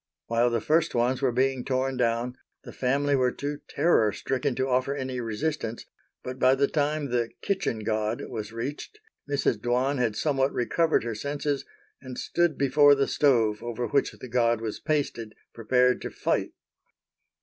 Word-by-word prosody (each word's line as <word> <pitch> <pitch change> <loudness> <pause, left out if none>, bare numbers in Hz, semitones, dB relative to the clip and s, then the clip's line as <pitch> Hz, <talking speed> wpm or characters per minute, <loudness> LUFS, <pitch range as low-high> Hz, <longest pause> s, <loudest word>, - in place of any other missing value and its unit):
While 115 +1 +2
the 120 -1 0
first 160 -2 +1
ones 125 +3 +1
were 130 -2 +2
being 130 +1 +1
torn 130 0 -1
down, 120 0 0 0.3
the - - -10
family 140 +2 +1
were 125 -2 +2
too 145 +2 -4
terror 115 -11 +3
stricken 130 +5 -2
to 130 +1 0
offer 130 +2 +1
any 130 -2 -4
resistance, 115 +1 -3 0.4
but 125 0 -6
by 130 +1 +5
the 140 +1 +2
time 150 -2 -1
the 120 -2 0
"kitchen 190 - -1
god" 110 +1 -1
was 110 -3 -6
reached 135 - -6 0.3
Mrs. 140 -6 +1
Dwan 125 +4 +1
had 115 -4 0
somewhat 135 -1 +1
recovered 160 +7 +1
her 115 -1 -3
senses 145 +4 -2 0.4
and 130 -2 -8
stood 175 -3 0
before 145 +1 +5
the 140 0 +1
stove 115 -7 +2
over 120 0 -3
which 140 -1 +1
the - - -10
god 120 -1 +2
was 110 -2 -4
pasted, 140 -8 -2 0.2
prepared 125 +2 +2
to - - -4
fight. - - -1
130 Hz, 165 wpm, -27 LUFS, 120-140 Hz, 0.4 s, by